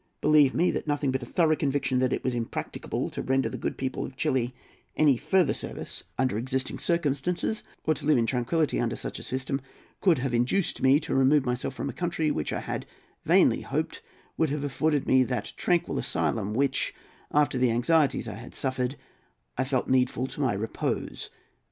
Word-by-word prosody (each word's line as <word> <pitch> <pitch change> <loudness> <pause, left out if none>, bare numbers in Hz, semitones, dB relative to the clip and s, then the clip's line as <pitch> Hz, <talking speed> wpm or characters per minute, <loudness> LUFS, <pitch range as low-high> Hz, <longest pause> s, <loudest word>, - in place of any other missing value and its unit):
Believe 150 -3 +5
me 180 - +3
that - - -4
nothing 145 -2 +1
but 130 0 -1
a 120 - -7
thorough 160 +1 +3
conviction 140 -3 0
that 130 0 +2
it - - -1
was 130 - 0
impracticable 115 -2 -3
to - - -4
render 135 0 +1
the - - -6
good - - -3
people 130 -1 -2
of 130 - -7
Chili 125 -2 0 0.4
any 150 -3 +5
further 155 +6 +2
service - - -6
under 130 -5 +1
existing 130 +2 -2
circumstances, 170 +5 0 0.2
or 155 - +2
to 145 -1 -6
live 150 -3 +5
in 115 - +2
tranquillity 130 +6 0
under 120 0 0
such - - -6
a - - -8
system, 130 +1 -2 0.4
could 180 -5 +4
have 130 -1 -2
induced 125 +11 +1
me 135 +2 +5
to - - -3
remove 135 +1 +4
myself 125 +2 -2
from - - -3
a - - -4
country 165 -3 -1
which 75 - -2
I - - -2
had - - -4 0.4
vainly - - +4
hoped - - -3 0.4
would 160 - +2
have 145 0 -2
afforded 145 +1 0
me 130 0 +5
that 125 0 -3
tranquil 175 -2 +1
asylum 105 +2 -1
which, 135 +1 +1 0.3
after 145 -3 +2
the 125 -1 +4
anxieties 135 +3 +2
I 110 - -4
had 115 +4 -9
suffered, 130 0 -1 0.6
I 130 - +1
felt 130 -1 0
needful 130 -1 +2
to 140 - -6
my 130 -5 +2
repose. 105 +3 -3
135 Hz, 190 wpm, -27 LUFS, 125-150 Hz, 0.6 s, Believe